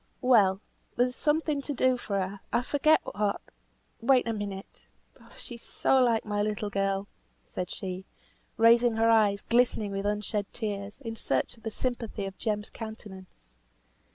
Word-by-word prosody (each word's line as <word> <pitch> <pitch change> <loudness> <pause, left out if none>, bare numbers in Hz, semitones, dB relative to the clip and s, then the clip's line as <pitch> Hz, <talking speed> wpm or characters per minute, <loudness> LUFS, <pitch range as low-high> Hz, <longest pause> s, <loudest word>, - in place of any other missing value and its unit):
"Well, 205 -6 +4 0.3
there's 250 +1 +1
something 300 -1 +1
to 290 - -3
do 255 0 +3
for 205 -5 -2
her; 195 +1 -3
I 245 - +1
forget 305 +4 +3
what; 205 -1 -1 0.6
wait 250 0 +4
a 230 - 0
minute! 200 -2 -6 0.5
She 245 - -8
is 235 - -9
so 265 - +2
like 235 -3 +2
my 205 -1 -1
little 210 0 -2
girl;" 195 0 0 0.4
said 180 -1 -5
she, 185 0 -6 0.5
raising 230 +1 +5
her 225 +1 +4
eyes, 210 -3 +3
glistening 235 -4 +2
with 195 +1 -2
unshed 210 0 -2
tears, 205 +1 -4
in 225 -3 -5
search 225 - -1
of 230 - -21
the 220 - -3
sympathy 230 -3 -3
of 195 0 -6
Jem's 210 -2 -2
countenance. 190 - -10
215 Hz, 155 wpm, -28 LUFS, 200-240 Hz, 0.6 s, raising